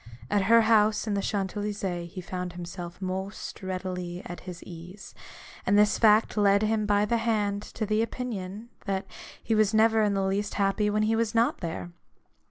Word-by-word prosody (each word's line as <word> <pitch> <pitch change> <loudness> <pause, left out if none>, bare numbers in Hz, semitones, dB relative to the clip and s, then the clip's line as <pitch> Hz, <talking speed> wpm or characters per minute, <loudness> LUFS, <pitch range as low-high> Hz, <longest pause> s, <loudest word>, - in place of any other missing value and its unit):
At 205 -2 +2
her 230 +3 +6
house 215 -1 +3
in 215 - -1
the 200 - 0
Champs 195 -1 -2
Ely 210 0 -2
sees 175 -4 -4
he 185 - -5
found 180 0 -5
himself 175 0 -7
most 190 +2 -5
readily 185 -1 -4
at 175 - -7
his 180 -1 -9
ease: 180 +3 -11 0.5
and 200 +2 +3
this 210 0 +4
fact 215 0 +5
led 200 -1 +4
him 215 -1 +1
by 205 0 +3
the 235 +3 +1
hand 210 -3 0
to 215 - -5
the 215 +1 +1
opinion, 225 -2 -4 0.2
that 195 0 -1 0.4
he 225 - 0
was 215 -1 +3
never 220 0 +4
in 205 -2 +2
the 195 0 +1
least 200 +2 -1
happy 200 +1 +1
when 210 +1 +1
he 220 +1 +2
was 230 0 0
not 230 +1 +2
there. 170 0 -5
205 Hz, 190 wpm, -27 LUFS, 185-215 Hz, 0.5 s, her